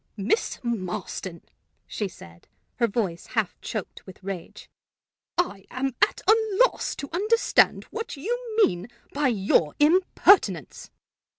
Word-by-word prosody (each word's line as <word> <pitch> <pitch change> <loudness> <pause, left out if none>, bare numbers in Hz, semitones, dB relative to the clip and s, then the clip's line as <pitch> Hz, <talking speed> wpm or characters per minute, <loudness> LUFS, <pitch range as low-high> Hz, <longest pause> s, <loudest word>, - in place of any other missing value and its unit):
"Miss 215 - 0
Marston," 190 -5 -4 0.4
she 210 - -3
said, 85 - -15 0.3
her 235 - +3
voice 195 -6 -2
half 215 -5 +1
choked 215 -5 -6
with 190 0 -13
rage, 190 -3 -7 0.7
"I 205 - -1
am 265 +1 -2
at 410 - +3
a 435 - +8 0.3
loss - - -3
to 280 - -7
understand 430 +6 +3
what 455 -6 -5
you 460 - -3
mean 175 +3 -4 0.3
by 285 0 +1
your 190 -9 +2
impertinence." 300 - +3
230 Hz, 120 wpm, -25 LUFS, -, 0.7 s, a